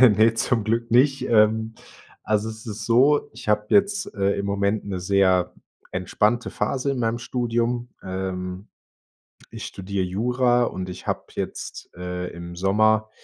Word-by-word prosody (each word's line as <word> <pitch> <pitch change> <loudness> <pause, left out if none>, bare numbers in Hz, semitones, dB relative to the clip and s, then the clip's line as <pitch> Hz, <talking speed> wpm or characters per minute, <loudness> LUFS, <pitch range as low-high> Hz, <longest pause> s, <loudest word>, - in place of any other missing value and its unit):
Ne, 115 -2 +6
zum 115 -1 +1
Glück 115 +1 -1
nicht, 135 +3 +4
ähm. 110 0 +3 0.5
Also, 105 +1 0
es 110 +1 -9
ist 105 -1 -5
so, 135 +6 +4
ich - - -10
habe 105 0 +2
jetzt, 200 0 +2
äh, 100 -1 +1
im 100 - -2
Moment 100 +1 0
'ne 95 -2 -3
sehr 95 -1 +2 0.4
entspannte 105 +6 0
Phase 140 +1 -1
in 135 - -2
meinem 115 0 0
Studium. 120 0 -1
Ähm, 95 +1 -4 0.8
ich - - -7
studiere 95 0 -3
Jura, 120 +5 +2
und 95 -4 -4
ich 90 - -9
habe - - -1
jetzt, - - -6
äh, 90 0 -4
im 85 0 -8
Sommer 110 +3 +2
110 Hz, 150 wpm, -24 LUFS, 95-120 Hz, 0.8 s, Ne